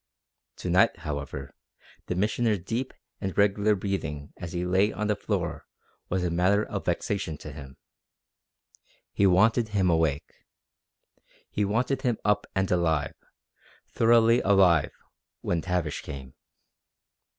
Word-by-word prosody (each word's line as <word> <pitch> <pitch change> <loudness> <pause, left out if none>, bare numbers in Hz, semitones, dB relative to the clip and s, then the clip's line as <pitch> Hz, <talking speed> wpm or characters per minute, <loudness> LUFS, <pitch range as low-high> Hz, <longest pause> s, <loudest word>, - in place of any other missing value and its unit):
To - - -5
night, - - +4
however, 70 -3 -5 0.5
the 90 - -2
Missioner's 105 +1 +1
deep 120 +6 -3 0.3
and 95 -4 -4
regular 100 +1 +3
breathing 90 -7 -4
as 85 -2 -7
he 90 +1 -2
lay 95 +4 +2
on 105 - -3
the 105 0 +1
floor - - -3 0.4
was 95 0 0
a 90 - 0
matter 95 +5 +2
of - - -5
vexation 80 -6 -2
to 75 - -9
him. 70 -2 -11 1.4
He 100 - +3
wanted 110 +5 +4
him 100 -4 +1
awake. 80 -4 -1 1.0
He 105 - 0
wanted 125 +6 0
him 120 -4 0
up 105 0 +2
and 95 0 0
alive, 80 -4 +1 0.8
thoroughly 115 +1 +4
alive, 95 -6 +4 0.5
when 85 -1 -1
Tavish 90 -4 -2
came. 70 -3 -9
95 Hz, 130 wpm, -27 LUFS, 80-105 Hz, 1.4 s, night